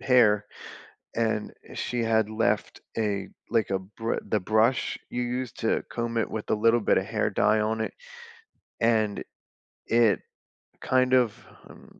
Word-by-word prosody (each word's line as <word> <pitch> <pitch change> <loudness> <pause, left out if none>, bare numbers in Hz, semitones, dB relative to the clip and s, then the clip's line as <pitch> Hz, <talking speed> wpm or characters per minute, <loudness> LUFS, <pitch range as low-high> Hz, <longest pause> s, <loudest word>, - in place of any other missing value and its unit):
hair, 105 -5 +4 0.7
and 110 -2 0 0.2
she 120 -1 -2
had 110 -2 +2
left 110 +1 -1 0.2
a 100 -3 -1 0.2
like 115 -4 +1
a 95 - +1
br 110 +4 -4
the 105 - +1
brush 110 +6 +2
you 125 - -2
use 125 -1 -3
to 110 - +1
comb 115 -1 -2
it, 115 - 0
with 110 - -5
a - - +4
little 115 +2 +3
bit 105 - +3
of - - -1
hair - - 0
dye 110 0 +3
on 110 +1 0
it. - - -3 0.9
And, 110 -3 +2 0.6
it 115 -2 +4 0.6
kind 130 0 +2
of, 125 -4 +4 0.3
hmm, - - -15
110 Hz, 150 wpm, -27 LUFS, 105-120 Hz, 0.9 s, hair